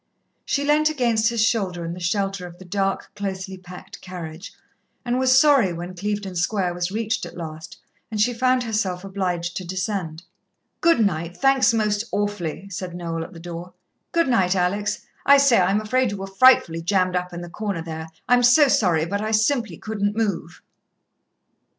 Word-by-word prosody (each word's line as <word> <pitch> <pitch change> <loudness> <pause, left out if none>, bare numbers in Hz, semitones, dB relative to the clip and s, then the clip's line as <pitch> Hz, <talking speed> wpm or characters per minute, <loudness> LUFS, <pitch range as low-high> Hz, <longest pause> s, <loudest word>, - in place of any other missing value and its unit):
She 280 - 0
leant 305 +1 +3
against 235 -6 +1
his 230 -2 +2
shoulder 185 -7 -1
in 165 - -4
the 180 - -8
shelter 195 +1 -1
of 175 0 -13
the 185 - -13
dark, 195 +1 -2
closely 190 -1 -4
packed 180 -1 -12
carriage, 180 0 -8 0.5
and 245 +1 0
was 260 0 +4
sorry 265 - +5
when 175 +2 -6
Clevedon 200 0 -4
Square 180 +1 0
was 175 0 -2
reached 220 +2 -2
at - - -8
last, 160 -2 -8 0.3
and 215 -2 -4
she 245 +4 +3
found 255 +1 +2
herself 205 -5 -2
obliged 180 -3 -3
to 185 - -4
descend. 180 -3 -4 0.6
"Good 330 -10 +4
night 170 -2 -2
thanks 270 0 +4
most 210 -2 0
awfully," 200 -3 -3
said 180 -1 -5
Noel 165 -2 -4
at - - -11
the 165 - -10
door. 175 +1 -8 0.4
"Good 335 -2 +2
night, 190 -7 +2
Alex. 190 +3 -1 0.2
I 280 0 +7
say, 275 -5 +5
I'm 190 +3 +2
afraid 255 +4 +1
you 200 - -4
were 195 - -5
frightfully 195 -5 +4
jammed 185 +1 +1
up 180 0 -2
in 175 0 -6
the 175 - -7
corner 200 -3 -3
there 160 -1 -6 0.2
I'm 245 +1 +5
so 260 +4 +6
sorry, 170 -9 +2
but 200 +4 -2
I 215 - -2
simply 220 - +1
couldn't 205 -1 -2
move." 190 -6 -2
195 Hz, 180 wpm, -23 LUFS, 175-225 Hz, 0.6 s, I